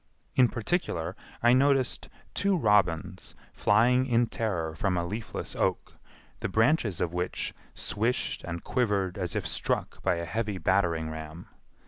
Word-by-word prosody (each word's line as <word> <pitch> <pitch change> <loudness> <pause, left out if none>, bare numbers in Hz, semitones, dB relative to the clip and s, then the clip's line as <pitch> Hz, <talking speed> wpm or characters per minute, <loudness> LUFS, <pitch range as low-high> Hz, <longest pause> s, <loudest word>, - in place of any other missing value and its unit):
In 130 -2 +6
particular, 120 - -1 0.3
I 120 0 +6
noticed 135 -1 +2 0.2
two 200 -2 +2
robins 95 - +1 0.2
flying 125 +6 +3
in 120 -1 +3
terror 90 -9 -2
from 90 +3 0
a 85 - 0
leafless 105 +5 -5
oak, - - -1 0.5
the - - -2
branches 110 - +2
of 85 -1 0
which 90 0 -2 0.2
swished 115 +5 -1
and 85 -1 -5
quivered 100 -7 0
as 90 -3 -3
if - - -1
struck - - -2
by - - +2
a 85 0 -3
heavy 105 +3 -2
battering 85 -5 +1
ram. 80 +1 -8
100 Hz, 140 wpm, -28 LUFS, 85-120 Hz, 0.5 s, In